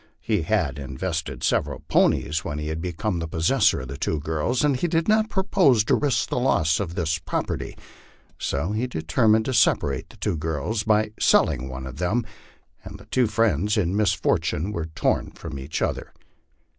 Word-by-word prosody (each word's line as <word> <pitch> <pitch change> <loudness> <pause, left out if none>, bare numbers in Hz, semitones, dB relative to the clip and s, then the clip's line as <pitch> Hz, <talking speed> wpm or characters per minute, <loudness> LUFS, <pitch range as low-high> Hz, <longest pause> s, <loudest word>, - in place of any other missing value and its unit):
He 105 -5 0
had 80 -7 0
invested 80 +4 -4
several - - 0
ponies 75 +1 +2
when 75 - -4
he 75 +1 -3
became 90 +4 -3
the 80 - -3
possessor 90 - +2
of 65 - -7
the 70 +2 -7
two 80 - -1
girls, 80 - -1
and 145 -2 +3
he 150 +8 0
did 165 0 0
not 215 0 +3
propose 185 - +3
to - - +1
risk 135 -5 +1
the - - 0
loss 80 - +2
of 90 -4 -4
this 80 -4 0
property. - - -3 0.6
So 75 +8 -1
he 110 +4 -1
determined 110 +4 +2
to 130 - -1
separate 70 - +2
the - - -16
two 85 - -1
girls 80 +7 -2
by 110 -1 +2
selling 65 +2 +3
one 65 0 -6
of 65 +1 -8
them; 100 +7 0 0.6
and - - -9
the - - -15
two 125 -3 +3
friends 105 -2 +1
in 95 -2 +1
misfortune 100 -3 +1
were 85 -5 -3
torn 80 - -1
from 75 -4 -7
each 70 +4 -3
other. - - -3
90 Hz, 180 wpm, -24 LUFS, 80-115 Hz, 0.6 s, and